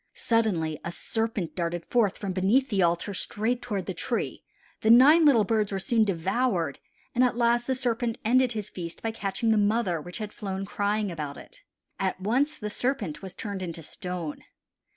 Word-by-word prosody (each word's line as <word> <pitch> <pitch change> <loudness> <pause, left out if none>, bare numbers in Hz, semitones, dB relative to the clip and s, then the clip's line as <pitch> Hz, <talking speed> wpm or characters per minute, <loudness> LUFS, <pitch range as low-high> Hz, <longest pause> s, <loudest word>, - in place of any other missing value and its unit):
Suddenly 180 -10 0
a 170 - -4
serpent 220 -1 -3
darted 170 -1 -2
forth 220 -6 +2
from 200 -2 -3
beneath 210 +9 +2
the 200 -4 +1
altar 175 +3 +1
straight 225 +6 -1
toward 210 -6 -3
the - - -3
tree; - - -3 0.4
the 220 - +1
nine 290 +8 +8
little 250 -7 +6
birds 215 0 0
were 195 - -1
soon 220 +3 +2
devoured 185 - 0 0.3
and 250 - +3
at 250 -2 +2
last 240 0 +2
the 260 - +1
serpent 240 -2 -1
ended 250 +1 +4
his 210 -2 -5
feast 170 -2 -6
by 225 - 0
catching 210 +1 -1
the 220 - +4
mother 205 -5 +1
which 175 +3 -8
had 215 -2 -5
flown 195 -1 -4
crying 205 0 -1
about 150 -4 -5
it. - - -12 0.4
At 190 -1 -1
once 265 +10 +1
the 210 -5 -5
serpent 225 - -2
was 190 -2 -8
turned 200 -3 -5
into 170 -2 -5
stone. 180 -2 -5
210 Hz, 185 wpm, -27 LUFS, 185-235 Hz, 0.4 s, nine